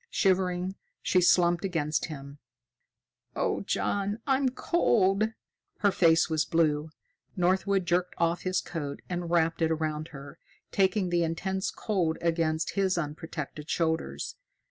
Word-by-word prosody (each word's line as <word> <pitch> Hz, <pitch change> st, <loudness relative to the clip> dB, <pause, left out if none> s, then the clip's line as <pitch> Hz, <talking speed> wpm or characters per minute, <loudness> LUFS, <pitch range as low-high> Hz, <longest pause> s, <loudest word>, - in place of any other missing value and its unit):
Shivering, 185 Hz, -1 st, +1 dB, 0.3 s
she 185 Hz, -, +3 dB
slumped 175 Hz, 0 st, +4 dB
against 160 Hz, -5 st, 0 dB
him. 140 Hz, -2 st, -9 dB, 1.0 s
"Oh, -, -, 0 dB
John! 205 Hz, +1 st, -1 dB
I'm 270 Hz, -1 st, +2 dB
cold." 215 Hz, -, +2 dB, 0.5 s
Her 205 Hz, -1 st, +4 dB
face 165 Hz, -4 st, +4 dB
was 160 Hz, -2 st, +1 dB
blue. 155 Hz, -2 st, +1 dB, 0.5 s
Northwood 190 Hz, +1 st, +2 dB
jerked 175 Hz, +1 st, 0 dB
off 170 Hz, +1 st, +1 dB
his 185 Hz, -1 st, 0 dB
coat 145 Hz, -5 st, -5 dB
and 175 Hz, -1 st, -3 dB
wrapped 165 Hz, -1 st, +2 dB
it 160 Hz, -, +3 dB
around 155 Hz, -1 st, -2 dB
her, 140 Hz, -2 st, -11 dB, 0.3 s
taking 190 Hz, -1 st, +2 dB
the 175 Hz, 0 st, +2 dB
intense 190 Hz, +4 st, -2 dB
cold 180 Hz, -7 st, -1 dB
against 165 Hz, -1 st, 0 dB
his 190 Hz, -2 st, +1 dB
unprotected 150 Hz, -1 st, -5 dB
shoulders. 160 Hz, -1 st, -1 dB
175 Hz, 125 wpm, -28 LUFS, 160-190 Hz, 1.0 s, slumped